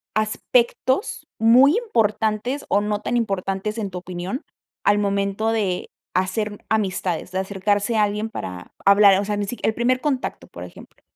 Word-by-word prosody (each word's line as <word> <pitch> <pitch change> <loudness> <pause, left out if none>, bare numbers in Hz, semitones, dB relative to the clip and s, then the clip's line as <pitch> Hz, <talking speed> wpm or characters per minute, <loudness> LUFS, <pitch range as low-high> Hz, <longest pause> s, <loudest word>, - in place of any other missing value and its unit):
aspectos 235 - 0
muy 250 +7 +6
importantes 225 - 0
o 205 - +3
no 210 0 -2
tan 240 - -1
importantes, 195 -1 -2
en 205 -3 -2
tu 180 - -7
opinión, 180 +7 -5 0.4
al 205 0 +4
momento 200 +2 0
de 200 -5 -1 0.2
hacer, 190 +4 0
mm, 205 - -9
amistades, 185 -5 -1
de 185 - -1
acercarse 205 +3 0
a 215 - +4
alguien 210 +2 -1
para 90 - -7
hablar, 200 -1 +7
o 200 - -2
sea, 210 0 -2
ni 205 - -1
si 245 - -4
qui - - -2
el 220 - +2
primer 250 +2 +1
contacto, 275 -4 -2
por - - -10
ejemplo. - - -13
210 Hz, 170 wpm, -22 LUFS, 195-225 Hz, 0.4 s, hablar